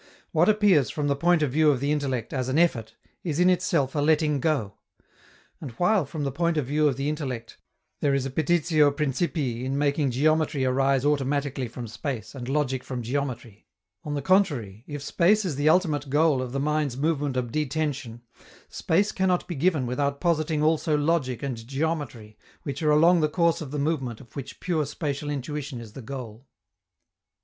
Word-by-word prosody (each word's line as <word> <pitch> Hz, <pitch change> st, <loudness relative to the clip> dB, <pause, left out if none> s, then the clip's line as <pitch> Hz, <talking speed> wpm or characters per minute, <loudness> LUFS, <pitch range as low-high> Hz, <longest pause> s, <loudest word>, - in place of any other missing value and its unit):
What -, -, +3 dB
appears, 205 Hz, -, +4 dB
from 150 Hz, -1 st, -2 dB
the 140 Hz, -, +2 dB
point 170 Hz, +2 st, +3 dB
of 140 Hz, -, 0 dB
view 155 Hz, +2 st, +4 dB
of 140 Hz, -4 st, +2 dB
the 140 Hz, +3 st, 0 dB
intellect, 135 Hz, -6 st, -2 dB
as 130 Hz, -1 st, -2 dB
an 130 Hz, -, 0 dB
effort, 125 Hz, -10 st, +1 dB, 0.3 s
is 160 Hz, -3 st, -2 dB
in 180 Hz, +1 st, +5 dB
itself 145 Hz, -6 st, +1 dB
a 150 Hz, -, -1 dB
letting 150 Hz, -1 st, +2 dB
go. 135 Hz, -9 st, 0 dB, 0.9 s
And 150 Hz, -, -6 dB
while, 180 Hz, -, +2 dB
from 150 Hz, 0 st, -5 dB
the 140 Hz, -, -1 dB
point 170 Hz, +3 st, 0 dB
of 150 Hz, -, 0 dB
view 150 Hz, +3 st, +2 dB
of 135 Hz, -3 st, 0 dB
the 140 Hz, +1 st, -2 dB
intellect, 130 Hz, -7 st, -4 dB, 0.4 s
there 140 Hz, -2 st, +2 dB
is 135 Hz, -1 st, -1 dB
a 135 Hz, -, -4 dB
petitio 155 Hz, 0 st, +3 dB
principii 140 Hz, -3 st, -1 dB
in 135 Hz, +2 st, -2 dB
making 145 Hz, 0 st, +1 dB
geometry 150 Hz, +1 st, +1 dB
arise 135 Hz, +1 st, +2 dB
automatically 140 Hz, -2 st, 0 dB
from 120 Hz, +1 st, -7 dB
space, 125 Hz, +1 st, -5 dB
and 130 Hz, -2 st, -7 dB
logic 135 Hz, -3 st, 0 dB
from 125 Hz, -2 st, -5 dB
geometry 120 Hz, -4 st, -4 dB, 0.4 s
on 145 Hz, -1 st, -4 dB
the 140 Hz, -, -3 dB
contrary, 140 Hz, -, +1 dB
if 145 Hz, -2 st, -6 dB
space 200 Hz, +8 st, +2 dB
is 165 Hz, -6 st, -2 dB
the 145 Hz, +3 st, +2 dB
ultimate 155 Hz, -5 st, +2 dB
goal 145 Hz, -1 st, +3 dB
of 125 Hz, -1 st, -5 dB
the 135 Hz, -, -2 dB
mind's 150 Hz, -3 st, 0 dB
movement 145 Hz, -2 st, 0 dB
of 120 Hz, -2 st, -2 dB
detension, 140 Hz, -5 st, -2 dB, 0.5 s
space 200 Hz, +6 st, +1 dB
cannot 185 Hz, -2 st, 0 dB
be 175 Hz, -, -4 dB
given 155 Hz, -2 st, +1 dB
without 140 Hz, +3 st, -1 dB
positing 155 Hz, -2 st, 0 dB
also 155 Hz, 0 st, +2 dB
logic 145 Hz, -5 st, 0 dB
and 120 Hz, -5 st, -5 dB
geometry, 135 Hz, -7 st, -3 dB, 0.2 s
which 140 Hz, +1 st, -5 dB
are 155 Hz, -, +2 dB
along 165 Hz, +3 st, +5 dB
the 155 Hz, -, +2 dB
course 170 Hz, +1 st, +1 dB
of 150 Hz, -, -6 dB
the 150 Hz, -, -4 dB
movement 140 Hz, -6 st, -1 dB
of 120 Hz, -5 st, -17 dB
which 140 Hz, -, -7 dB
pure 170 Hz, -4 st, 0 dB
spatial 145 Hz, 0 st, -4 dB
intuition 145 Hz, -1 st, -4 dB
is 110 Hz, -3 st, -11 dB
the 135 Hz, -, -8 dB
goal. 125 Hz, -1 st, -8 dB
145 Hz, 190 wpm, -26 LUFS, 130-155 Hz, 0.9 s, in